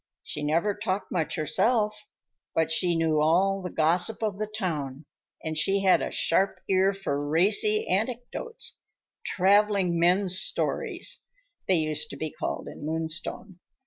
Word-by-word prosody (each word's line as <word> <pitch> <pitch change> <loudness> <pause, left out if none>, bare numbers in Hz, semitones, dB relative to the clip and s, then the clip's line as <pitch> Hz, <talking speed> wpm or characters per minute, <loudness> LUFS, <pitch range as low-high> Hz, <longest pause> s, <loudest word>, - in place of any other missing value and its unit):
She 150 - -5
never 165 +8 +1
talked 205 -1 -3
much 165 -4 -1
herself, 210 - +1 0.5
but 160 -1 +1
she 175 +1 +2
knew 160 -2 +1
all 190 +5 +2
the 180 - -5
gossip 175 +8 +1
of 205 -2 -2
the 215 - -2
town 155 - -4 0.4
and 160 0 -3
she 195 +5 +1
had 190 -1 +4
a - - -2
sharp 190 +4 +1
ear 190 0 +3
for 190 -8 -3
racy 220 - +3
anecdotes—"traveling 205 - -1
men's 185 +2 +3
stories," - - -1 0.4
they 190 - +4
used 155 -2 -1
to - - -8
be 155 +1 -4
called - - -4
in - - -9
Moonstone. 160 +4 -3
185 Hz, 140 wpm, -27 LUFS, 160-205 Hz, 0.5 s, had